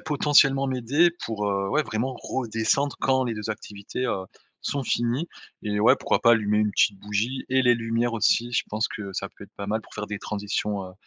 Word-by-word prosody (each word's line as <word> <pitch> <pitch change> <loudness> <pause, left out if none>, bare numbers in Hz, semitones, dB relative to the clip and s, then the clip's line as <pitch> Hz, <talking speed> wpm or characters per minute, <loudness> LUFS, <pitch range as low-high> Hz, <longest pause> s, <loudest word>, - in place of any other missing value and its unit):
potentiellement 140 -2 +3
m'aider 130 +7 +3
pour, 105 -2 -2
heu, 100 0 -1
ouais, 155 - +2
vraiment 125 +2 -2
redescendre 125 +3 0
quand 130 -1 +2
les 115 -2 -2
2 105 0 -4
activités, 105 +2 -5
heu, 95 -6 -2 0.4
sont 140 -1 -2
finies. 120 +10 0 0.3
Et 105 -1 -1
ouais, 110 - +6
pourquoi - - +1
pas 115 - +6
allumer 105 -2 +2
une 105 -1 +1
petite 100 -1 +2
bougie 105 +6 -2
et 130 0 +3
les 120 -1 +5
lumières 115 +1 -1
aussi. 120 +2 +2
Je 120 - +1
pense 110 +2 -1
que 100 -3 -6
ça - - -3
peut - - -13
être - - -21
pas 100 - -5
mal 110 +2 0
pour - - -17
faire 105 - -4
des 105 - -4
transitions, 105 -1 -3
heu, 95 - -10
115 Hz, 210 wpm, -25 LUFS, 105-130 Hz, 0.4 s, ouais